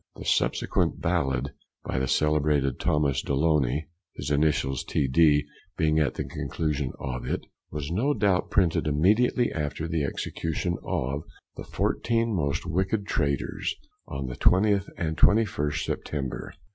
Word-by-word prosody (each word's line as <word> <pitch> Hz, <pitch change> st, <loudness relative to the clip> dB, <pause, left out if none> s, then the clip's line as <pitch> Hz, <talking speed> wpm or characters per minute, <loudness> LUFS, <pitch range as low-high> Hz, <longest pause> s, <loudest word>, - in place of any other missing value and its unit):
The -, -, -9 dB
subsequent -, -, +1 dB
ballad, 70 Hz, -6 st, 0 dB, 0.3 s
by -, -, -2 dB
the 65 Hz, -, 0 dB
celebrated 75 Hz, -2 st, +2 dB
Thomas 70 Hz, -3 st, +1 dB
Deloney, 75 Hz, -1 st, +1 dB, 0.3 s
(his 70 Hz, +2 st, -4 dB
initials 70 Hz, -3 st, +1 dB
T.D. 75 Hz, +2 st, +3 dB, 0.3 s
being 80 Hz, -2 st, +3 dB
at 75 Hz, -3 st, +1 dB
the -, -, -2 dB
conclusion 75 Hz, -5 st, -2 dB
of 60 Hz, -2 st, -4 dB
it) -, -, -2 dB, 0.2 s
was 75 Hz, +1 st, -5 dB
no 125 Hz, +11 st, +1 dB
doubt 100 Hz, -4 st, +1 dB
printed 85 Hz, -5 st, +2 dB
immediately 105 Hz, -, +3 dB
after 75 Hz, +1 st, -3 dB
the 80 Hz, -2 st, -1 dB
execution 80 Hz, +5 st, -2 dB
of 70 Hz, +3 st, -2 dB, 0.3 s
the -, -, -7 dB
"fourteen 115 Hz, -2 st, 0 dB
most 70 Hz, -4 st, -1 dB
wicked 95 Hz, +4 st, 0 dB
traitors," 70 Hz, -7 st, -1 dB, 0.3 s
on 70 Hz, 0 st, -4 dB
the 65 Hz, -1 st, -5 dB
20th 100 Hz, -, +3 dB
and 80 Hz, -1 st, -2 dB
21st 75 Hz, -9 st, +3 dB
September. 70 Hz, -4 st, -4 dB
75 Hz, 135 wpm, -27 LUFS, 70-90 Hz, 0.3 s, T.D